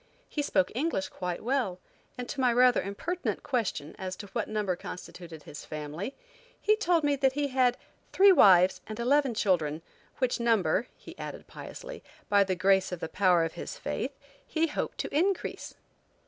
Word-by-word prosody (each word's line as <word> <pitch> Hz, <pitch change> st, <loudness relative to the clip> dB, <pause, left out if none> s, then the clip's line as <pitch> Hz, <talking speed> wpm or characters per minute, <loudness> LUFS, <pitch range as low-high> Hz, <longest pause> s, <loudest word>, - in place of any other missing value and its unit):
He 300 Hz, -, -2 dB
spoke 190 Hz, -10 st, +1 dB
English 255 Hz, -6 st, -1 dB
quite 180 Hz, -2 st, -4 dB
well, 240 Hz, -7 st, 0 dB, 0.4 s
and 250 Hz, -1 st, -5 dB
to 280 Hz, -, -3 dB
my 250 Hz, -1 st, +4 dB
rather 250 Hz, +1 st, +5 dB
impertinent 330 Hz, -, -3 dB
question 205 Hz, -, -2 dB
as 185 Hz, 0 st, -4 dB
to 205 Hz, -, -8 dB
what 230 Hz, -3 st, -1 dB
number 210 Hz, -4 st, -1 dB
constituted 170 Hz, -3 st, -9 dB
his 145 Hz, -, -9 dB
family 155 Hz, -, -6 dB, 0.6 s
told 345 Hz, -6 st, +2 dB
me 290 Hz, -1 st, +3 dB
that 265 Hz, -1 st, +2 dB
he 285 Hz, 0 st, -1 dB
had 255 Hz, -2 st, +2 dB, 0.3 s
three 395 Hz, +1 st, +7 dB
wives 185 Hz, -, +6 dB
and 215 Hz, +1 st, -6 dB
eleven 265 Hz, 0 st, +2 dB
children, 165 Hz, -7 st, +1 dB, 0.3 s
which 255 Hz, -2 st, 0 dB
number, 225 Hz, -2 st, +2 dB
he -, -, -12 dB
added -, -, -7 dB
piously, -, -, -9 dB, 0.3 s
by 200 Hz, -1 st, +5 dB
the 190 Hz, -1 st, -1 dB
grace 190 Hz, +1 st, +3 dB
of 180 Hz, -, -4 dB
the -, -, -4 dB
power 180 Hz, -2 st, +3 dB
of 165 Hz, -, -3 dB
his -, -, -7 dB
faith, -, -, -4 dB, 0.3 s
he 320 Hz, 0 st, +1 dB
hoped 305 Hz, -, -3 dB
to -, -, -4 dB
increase. 375 Hz, +5 st, -1 dB
215 Hz, 170 wpm, -29 LUFS, 185-270 Hz, 0.6 s, three